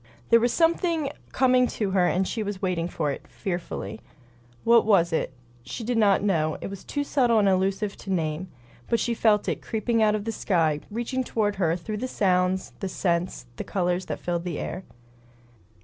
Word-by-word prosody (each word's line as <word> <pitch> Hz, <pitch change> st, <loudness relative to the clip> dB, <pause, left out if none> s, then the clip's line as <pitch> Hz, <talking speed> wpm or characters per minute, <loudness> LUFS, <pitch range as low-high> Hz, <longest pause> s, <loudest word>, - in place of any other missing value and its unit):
There 230 Hz, -, +8 dB
was 240 Hz, +1 st, +2 dB
something 330 Hz, -3 st, +1 dB, 0.2 s
coming 255 Hz, -1 st, +4 dB
to 205 Hz, -3 st, 0 dB
her 185 Hz, -2 st, +3 dB
and 185 Hz, +2 st, +1 dB
she 225 Hz, -, -2 dB
was 205 Hz, -2 st, -3 dB
waiting 180 Hz, -3 st, -1 dB
for 160 Hz, -4 st, -1 dB
it, -, -, -7 dB
fearfully. 140 Hz, -, -5 dB, 0.6 s
What 235 Hz, 0 st, +6 dB
was 175 Hz, -6 st, +3 dB
it? 160 Hz, -, 0 dB, 0.3 s
She 130 Hz, -, -6 dB
did 245 Hz, +2 st, -1 dB
not 200 Hz, -2 st, +4 dB
know; 155 Hz, -6 st, +1 dB
it -, -, -6 dB
was 200 Hz, -, -8 dB
too 285 Hz, -, -2 dB
subtle 250 Hz, -5 st, +2 dB
and 205 Hz, -2 st, +4 dB
elusive 195 Hz, +2 st, +1 dB
to -, -, -10 dB
name. 165 Hz, 0 st, -1 dB, 0.4 s
But 230 Hz, -, +2 dB
she 240 Hz, -, 0 dB
felt 215 Hz, -2 st, +3 dB
it, -, -, -1 dB
creeping 225 Hz, +1 st, 0 dB
out 215 Hz, -1 st, +4 dB
of 210 Hz, -1 st, -4 dB
the 225 Hz, -, -1 dB
sky, 165 Hz, -8 st, +1 dB
reaching 240 Hz, +4 st, -2 dB
toward 210 Hz, -4 st, -1 dB
her 170 Hz, -4 st, +2 dB
through 210 Hz, +5 st, -5 dB
the 255 Hz, +4 st, -3 dB
sounds, 185 Hz, -4 st, +1 dB
the 195 Hz, -, -3 dB
scents, 175 Hz, -5 st, -1 dB
the -, -, -3 dB
color 180 Hz, -2 st, 0 dB
that 185 Hz, -, -5 dB
filled 175 Hz, -1 st, -2 dB
the 175 Hz, -4 st, -3 dB
air. 190 Hz, -, -5 dB
195 Hz, 195 wpm, -26 LUFS, 175-230 Hz, 0.6 s, There